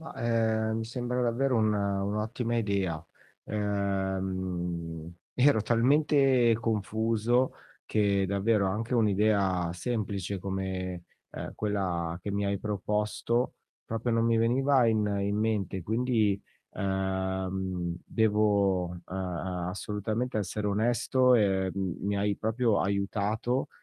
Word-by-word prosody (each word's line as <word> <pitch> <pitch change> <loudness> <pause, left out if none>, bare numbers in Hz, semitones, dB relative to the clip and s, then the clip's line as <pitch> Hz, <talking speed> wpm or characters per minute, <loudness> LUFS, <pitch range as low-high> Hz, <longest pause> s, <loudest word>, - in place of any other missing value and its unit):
Ma, 160 - -9
ehm, 110 -1 +1
mi 115 - -3
sembra 125 +1 -2
davvero 125 +2 +1
un 110 -1 +3
un'ottima 105 +4 -1
idea, 100 -7 -1 0.4
ehm, 95 -5 -2 0.2
ero 125 -4 +4
talmente 130 0 +4
confuso 115 +3 +1 0.3
che 100 -2 +2
davvero 100 +1 +2
anche 110 +6 -2
un'idea 100 -5 +2
semplice 100 -1 -3
come, 95 -2 -3 0.3
ehm, - - -6
quella 90 -5 -2
che 100 +3 -4
mi 100 0 0
hai 100 0 0
proposto 105 +4 -1 0.3
proprio 115 +2 -2
non 115 0 +2
mi 115 0 +3
veniva 130 +3 +3
in 110 -2 +2
in 100 +1 0
mente. 105 -4 -1
Quindi, 110 -3 +1 0.3
ehm, 95 -2 -2
devo, 100 -4 +2
ehm 90 - -9
ehm, 90 -1 -3
assolutamente 105 +5 -2
essere 105 +1 -2
onesto 120 +4 +3
e, 95 -3 +2
uhm, 95 -3 -3
mi 100 +1 -1
hai 100 0 0
proprio 110 0 +1
aiutato, 105 +5 -1
105 Hz, 115 wpm, -29 LUFS, 95-115 Hz, 0.4 s, ero